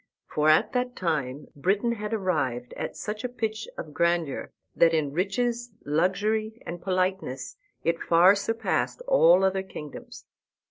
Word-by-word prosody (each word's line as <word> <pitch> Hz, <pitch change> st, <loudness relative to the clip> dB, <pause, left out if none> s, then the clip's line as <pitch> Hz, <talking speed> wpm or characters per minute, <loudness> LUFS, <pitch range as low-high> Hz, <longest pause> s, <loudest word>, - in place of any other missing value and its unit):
For 150 Hz, 0 st, +1 dB
at 155 Hz, -, +4 dB
that 250 Hz, 0 st, -1 dB
time 150 Hz, -5 st, -2 dB
Britain 195 Hz, -, +1 dB
had 210 Hz, -2 st, -4 dB
arrived 150 Hz, -, -1 dB
at -, -, -5 dB
such 210 Hz, +1 st, -5 dB
a 250 Hz, -, -2 dB
pitch 220 Hz, -2 st, -3 dB
of 150 Hz, -, -7 dB
grandeur 170 Hz, -2 st, 0 dB, 0.3 s
that 165 Hz, -1 st, +5 dB
in 145 Hz, -3 st, 0 dB
riches, 235 Hz, +6 st, -1 dB
luxury, 210 Hz, +8 st, 0 dB
and 175 Hz, 0 st, -6 dB
politeness 185 Hz, -8 st, -1 dB, 0.3 s
it 165 Hz, 0 st, 0 dB
far 175 Hz, +3 st, +6 dB
surpassed 225 Hz, -, -1 dB
all 180 Hz, -, +6 dB
other 190 Hz, 0 st, +2 dB
kingdoms. 150 Hz, -6 st, -9 dB
185 Hz, 140 wpm, -27 LUFS, 160-215 Hz, 0.3 s, far